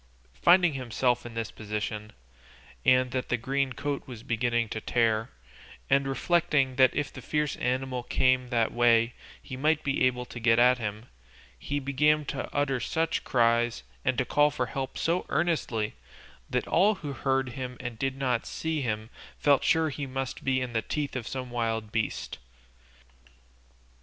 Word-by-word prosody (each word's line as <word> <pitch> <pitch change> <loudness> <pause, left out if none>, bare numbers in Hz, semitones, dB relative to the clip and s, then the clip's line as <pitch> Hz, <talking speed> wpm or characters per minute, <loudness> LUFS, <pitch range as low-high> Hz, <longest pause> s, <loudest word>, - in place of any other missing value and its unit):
Finding 175 -2 +6
himself 125 -1 0
in 115 - -11
this 115 -1 -3
position, 105 0 -4 0.7
and 130 0 +4
that 130 0 -3
the 125 - +1
green 135 +2 -1
coat 145 +3 -3
was 120 -4 -9
beginning 120 0 0
to 110 - -4
tear, 115 -2 +1 0.6
and 140 0 +4
reflecting 135 -2 +1
that 130 -1 +5
if 145 -1 -2
the 130 - -8
fierce 150 +2 -1
animal 130 0 -1
came 130 +1 +2
that 115 -3 +1
way 115 -1 +4 0.3
he 130 - -8
might 150 +3 +1
be 135 -2 0
able 125 -1 +1
to 120 - -8
get 115 0 +4
at 125 +1 +5
him, 105 0 -4 0.5
he 145 - -3
began 150 +2 +2
to - - -4
utter 140 -3 0
such 160 +5 -1
cries, 120 -1 +2 0.2
and 130 -1 0
call 150 0 +4
for 145 -4 -2
help 135 +2 -5
so 170 +2 0
earnestly, 120 -11 0 0.6
that - - -1
all 205 +5 +4
who 150 -7 -6
heard 135 -1 0
him 125 0 -6
and 120 -3 -6
did 135 0 -1
not 125 -4 0
see 160 -2 -2
him 110 -2 -3 0.3
felt 145 -2 +3
sure 160 -1 +3
he 145 -1 -5
must 135 0 -4
be 130 -1 +2
in 125 -2 -4
the 115 - +1
teeth 145 +4 -3
of 120 -3 -4
some 130 -2 -5
wild 115 -2 -2
beast. 110 -1 -2
130 Hz, 165 wpm, -28 LUFS, 120-140 Hz, 0.7 s, Finding